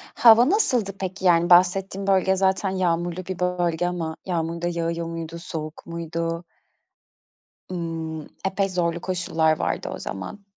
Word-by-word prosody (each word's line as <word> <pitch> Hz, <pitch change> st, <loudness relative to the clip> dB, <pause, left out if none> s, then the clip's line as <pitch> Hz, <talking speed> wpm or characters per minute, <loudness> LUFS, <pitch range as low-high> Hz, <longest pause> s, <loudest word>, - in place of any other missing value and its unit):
Hava 235 Hz, +3 st, +7 dB
nasıldı 250 Hz, -, +2 dB
peki? 190 Hz, 0 st, -4 dB
Yani, 175 Hz, -1 st, +4 dB
bahsettiğin 190 Hz, +2 st, +4 dB
bölge 190 Hz, 0 st, +3 dB
zaten 190 Hz, +1 st, +1 dB
yağmurlu 175 Hz, -1 st, -1 dB
bir 185 Hz, -2 st, -5 dB
bölge 175 Hz, -1 st, 0 dB
ama 165 Hz, -3 st, -3 dB
yağmur 170 Hz, -2 st, -2 dB
da 175 Hz, -, 0 dB
yağıyor 170 Hz, 0 st, -2 dB
muydu, 165 Hz, 0 st, -6 dB
soğuk 155 Hz, -2 st, -7 dB
muydu? 165 Hz, 0 st, -3 dB, 1.3 s
Iıı, 165 Hz, -3 st, -4 dB, 0.2 s
epey 195 Hz, 0 st, 0 dB
zorlu 170 Hz, -2 st, -1 dB
koşullar 165 Hz, -4 st, +1 dB
vardı -, -, -2 dB
o -, -, -6 dB
zaman. 100 Hz, -, -7 dB
175 Hz, 135 wpm, -24 LUFS, 165-190 Hz, 1.3 s, Hava